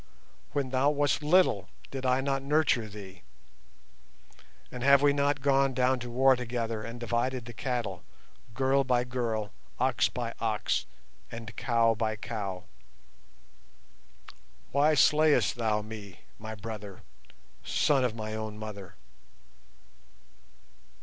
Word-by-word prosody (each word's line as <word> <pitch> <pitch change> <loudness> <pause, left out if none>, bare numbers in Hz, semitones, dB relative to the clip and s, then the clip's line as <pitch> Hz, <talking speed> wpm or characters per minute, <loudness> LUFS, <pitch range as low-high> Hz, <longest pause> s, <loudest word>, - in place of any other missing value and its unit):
When 140 -3 -1
thou 135 +2 +3
wast 145 +1 +1
little 150 - +3 0.2
did 130 -1 -3
I 130 +1 +3
not 135 0 -1
nurture 140 -5 +2
thee, 95 -3 -11 1.5
and 125 - -7
have 140 +2 +5
we 145 -1 +5
not 140 0 +1
gone 135 -1 +3
down 130 0 +2
to 120 0 -6
war 130 +2 +4
together 115 -2 -3
and 115 +2 -7
divided 120 +1 -1
the 120 - -9
cattle, 125 -4 -3 0.5
girl 135 +1 +2
by 125 -2 +2
girl, 115 -4 -2 0.3
ox 120 -7 +2
by 120 -2 -4
ox, 110 -2 0 0.4
and 115 -1 -8
cow 115 -2 +2
by 110 0 -1
cow? 100 -4 -5 2.1
Why 150 +2 +4
slayest 150 +2 +4
thou 110 -3 0
me, 105 -4 -10 0.2
my 110 +1 -6
brother, 105 -2 -8 0.6
son 140 -4 +2
of 120 -3 0
my 110 -1 -5
own 110 -1 -5
mother? 105 -3 -8
120 Hz, 125 wpm, -29 LUFS, 110-135 Hz, 2.1 s, have